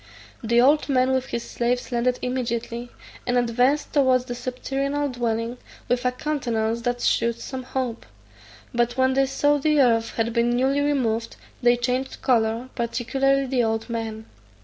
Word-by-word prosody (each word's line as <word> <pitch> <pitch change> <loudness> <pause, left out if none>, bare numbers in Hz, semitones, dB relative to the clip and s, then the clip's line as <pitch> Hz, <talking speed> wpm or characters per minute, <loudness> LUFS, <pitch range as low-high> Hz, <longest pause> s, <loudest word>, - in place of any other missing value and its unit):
The 235 +1 +3
old 290 +5 +4
man 260 -1 +3
with 260 0 0
his 235 - -4
slaves 245 +2 -1
landed 245 +1 +1
immediately, 240 -1 -3 0.4
and 245 0 +2
advanced 245 +5 +1
towards 260 -4 +3
the 245 - -4
subterranean 270 +3 -2
dwelling, 235 0 -2 0.3
with 245 0 0
a 250 - +3
countenance 235 -5 -1
that 245 +1 -2
shewed 235 0 +1
some 260 +1 -5
hope; 255 -2 -4 0.7
but 240 +1 0
when 260 0 +3
they 270 0 +3
saw 290 +2 +2
the 300 0 +2
earth 230 -4 +3
had 230 0 0
been 240 +1 +2
newly 270 +3 +2
removed, 235 -6 0 0.3
they 240 0 +4
changed 250 +2 -2
colour, 230 0 +1
particularly 270 +3 0
the 255 -2 +1
old 225 +1 -1
man. 220 -1 -4
245 Hz, 155 wpm, -24 LUFS, 235-265 Hz, 0.7 s, old